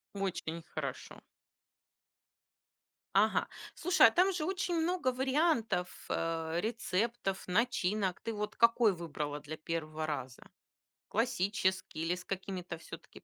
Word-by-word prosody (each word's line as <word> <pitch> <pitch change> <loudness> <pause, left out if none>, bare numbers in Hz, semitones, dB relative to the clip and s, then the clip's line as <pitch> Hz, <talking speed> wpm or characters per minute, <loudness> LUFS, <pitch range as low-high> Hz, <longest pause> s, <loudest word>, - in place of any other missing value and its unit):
Очень 170 -4 -3
хорошо. - - -5 2.0
Ага. - - +4 0.3
Слушай, 360 +2 +6
а - - +6
там 375 +2 +4
же 335 -4 -2
очень 370 -1 -1
много 330 -5 +1
вариантов, 260 - +1
э, 165 0 -1
рецептов, 220 -2 -1
начинок. 200 -2 +1
Ты 230 - -3
вот 210 0 -3
какой 230 -2 +5
выбрала 150 -4 -4
для 155 +2 -7
первого 155 -1 -3
раза? 130 -4 -4 0.7
Классический 190 -6 0
или 165 +2 +1
с 180 - -9
какими-то 185 -2 -4
всё-таки, 160 - -11
195 Hz, 115 wpm, -33 LUFS, 165-240 Hz, 2.0 s, Слушай